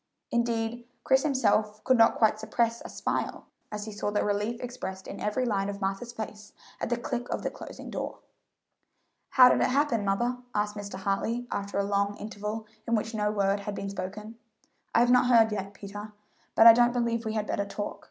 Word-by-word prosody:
Indeed, 235 0 -1 0.2
Chris 265 0 +4
himself 215 -7 +1
could 260 - +4
not 225 -1 +5
quite 215 -1 +3
suppress 230 +1 0
a - - -8
smile - - -3 0.3
as 210 -1 -4
he 220 - -6
saw 205 0 -2
the 205 0 0
relief 210 +3 -1
expressed 240 -7 -6
in 200 - -7
every 230 +5 0
line 200 -4 0
of 200 0 -5
Martha's 195 +4 -3
face 210 -2 -8 0.3
at - - -2
the 240 - +1
click 240 +1 -4
of - - -3
the - - -1
closing - - -9
door. - - -4 1.1
"How 255 -1 +8
did - - +3
it - - +4
happen, 265 -5 +2
mother?" 240 +6 0 0.2
asked 210 0 0
Mr. 205 -1 -6
Hartley, 200 +5 -1
after 200 0 -3
a 200 - +2
long 200 0 0
interval 210 +1 -5 0.2
in 230 - +2
which 220 +1 -2
no 210 -1 0
word 200 -1 +1
had 200 0 -5
been 195 0 -4
spoken. 210 +4 -6 0.6
"I - - +6
have 240 +1 +4
not 250 0 +5
heard 230 -3 +5
yet, 200 -1 -4
Peter; 205 +2 -8 0.4
but 225 - +7
I 230 - +12
don't 240 +1 +4
believe 235 -1 0
we 220 -1 -3
had 215 -1 -1
better 200 - -1
talk. 205 +1 -5
215 Hz, 200 wpm, -28 LUFS, 205-235 Hz, 1.1 s, I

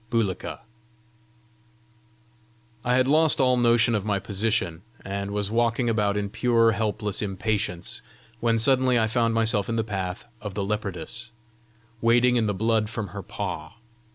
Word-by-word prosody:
BULIKA 115 -5 -2 2.2
I 125 0 +2
had 130 0 +3
lost 155 +2 +4
all 130 -1 +4
notion 120 -1 +3
of 105 -3 0
my 105 -1 0
position, 100 -4 -1 0.2
and 100 +1 -3
was 100 0 -2
walking 120 +1 +1
about 105 -2 +1
in 100 -1 -2
pure, 115 -1 +3
helpless 105 -1 -2
impatience, 100 -2 -2 0.4
when 115 -1 +2
suddenly 130 +2 +3
I 110 - +3
found 115 0 +1
myself 110 -3 +1
in 115 - 0
the 115 - +1
path 95 -3 -4 0.2
of 105 -3 -6
the 100 - -1
leopardess, 105 +3 -4 0.7
wading 120 +2 +4
in 115 -3 +2
the 105 - -1
blood 110 +1 +1
from 110 -4 -4
her - - -6
paw. 80 +7 -5
110 Hz, 150 wpm, -25 LUFS, 100-120 Hz, 2.2 s, lost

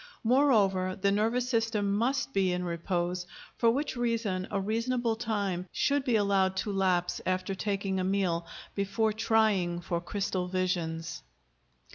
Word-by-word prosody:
Moreover 210 -8 +3
the 200 +1 +2
nervous 225 +5 +1
system 225 -4 +1
must 250 +4 0
be 190 -2 +2
in 180 0 -1
repose, 175 +1 -2 0.3
for 230 - +3
which 270 +4 -1
reason 230 -6 -1
a 200 - -1
reasonable 230 +3 0
time 200 -5 -2
should 285 -1 +1
be 245 -3 +1
allowed 195 -2 +2
to 205 - -1
lapse 185 -2 +1
after 185 +1 -1
taking 195 -1 -2
a - - 0
meal, 185 -3 0 0.3
before 200 +2 0
trying 210 -6 +2
for 170 0 -3
crystal 185 0 -2
visions. 175 -2 -2
200 Hz, 140 wpm, -29 LUFS, 185-225 Hz, 0.3 s, Moreover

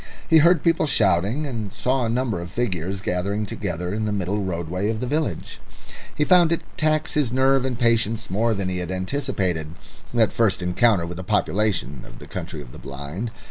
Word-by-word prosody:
He 160 -2 +6
heard 170 0 +5
people 165 -2 +2
shouting, 105 - +2
and 115 -7 -4
saw 130 0 0
a - - -1
number 115 -6 -1
of 85 - -7
figures 95 -3 -2
gathering 100 +4 -1
together 90 -3 -4
in 110 +1 -1
the 105 - -1
middle 100 +1 -1
roadway 90 +2 -2
of 110 -1 -2
the 125 - -2
village. 150 +4 -2 0.6
He 150 - +1
found 175 0 +5
it 170 - +1
tax 155 0 +1
his 145 -6 +1
nerve 135 +1 +3
and 125 -3 -2
patience 115 -3 +1
more 110 +3 +1
than 100 -1 -2
he 90 -1 -2
had 90 -1 -4
anticipated, 95 - -2 0.4
that 115 -3 +2
first 105 -6 +2
encounter 90 +1 +3
with 85 0 -6
the 95 - -5
population 95 - 0
of - - -13
the - - -11
Country - - -6
of - - -14
the - - -11
Blind. 70 - -6
105 Hz, 195 wpm, -23 LUFS, 90-125 Hz, 0.6 s, He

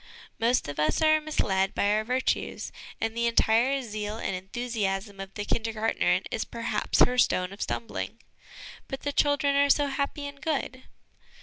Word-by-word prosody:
Most 235 +2 +2
of 145 +1 -5
us 150 - +2
are 310 0 +5
misled 195 -11 0
by 205 - +2
our 215 +1 +2
virtues, 255 +3 -1 0.3
and 225 0 -2
the 235 0 +1
entire 235 +4 +3
zeal 210 -1 -4
and 195 - -2
enthusiasm 200 0 -3
of 195 0 -6
the 205 - -3
Kindergartnerin 225 0 +1
is - - -1
perhaps - - -1
her 250 0 -1
stone 185 -4 +2
of 200 - -11
stumbling. 230 - -3 0.4
' - - -14
But 270 - -5
the 285 - -2
children 285 -1 +2
are 285 0 +4
so 290 +1 +4
happy 280 +1 -2
and 285 0 -8
good 265 -4 -2
230 Hz, 170 wpm, -27 LUFS, 205-275 Hz, 0.4 s, are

